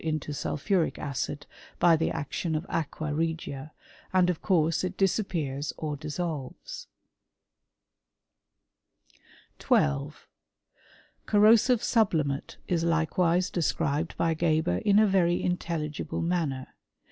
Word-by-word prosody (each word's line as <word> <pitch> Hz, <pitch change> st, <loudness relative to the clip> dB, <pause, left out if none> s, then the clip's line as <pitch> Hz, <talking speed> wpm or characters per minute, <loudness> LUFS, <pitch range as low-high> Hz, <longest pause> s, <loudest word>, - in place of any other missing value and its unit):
into 155 Hz, -2 st, -2 dB
sulphuric 160 Hz, +5 st, -1 dB
acid 145 Hz, +1 st, -4 dB, 0.3 s
by 170 Hz, -2 st, +5 dB
the 160 Hz, +1 st, 0 dB
action 160 Hz, +3 st, -3 dB
of 155 Hz, +3 st, -2 dB
aqua 155 Hz, -1 st, -2 dB
regia,' 155 Hz, -2 st, -3 dB, 0.4 s
and 185 Hz, -1 st, +3 dB
"Tf 175 Hz, -, -2 dB
course 165 Hz, -4 st, +2 dB
it 185 Hz, 0 st, -3 dB
disappears 165 Hz, -8 st, -1 dB
or 150 Hz, -2 st, -3 dB
dissolves. 150 Hz, -2 st, -5 dB, 2.7 s
3 -, -, +3 dB
l2. 70 Hz, 0 st, 0 dB, 1.1 s
Corrosive 220 Hz, +3 st, +5 dB
sublimate 160 Hz, -, +1 dB
is 170 Hz, -2 st, 0 dB
likewise 170 Hz, +2 st, +1 dB
described 160 Hz, -2 st, -1 dB
I 165 Hz, -1 st, +2 dB
Geber 160 Hz, -, +1 dB
in 205 Hz, -1 st, +3 dB
a 215 Hz, -, +6 dB
very 180 Hz, -3 st, +2 dB
intelligible 165 Hz, -5 st, -2 dB
manner. 160 Hz, -7 st, -1 dB
165 Hz, 105 wpm, -28 LUFS, 150-180 Hz, 2.7 s, a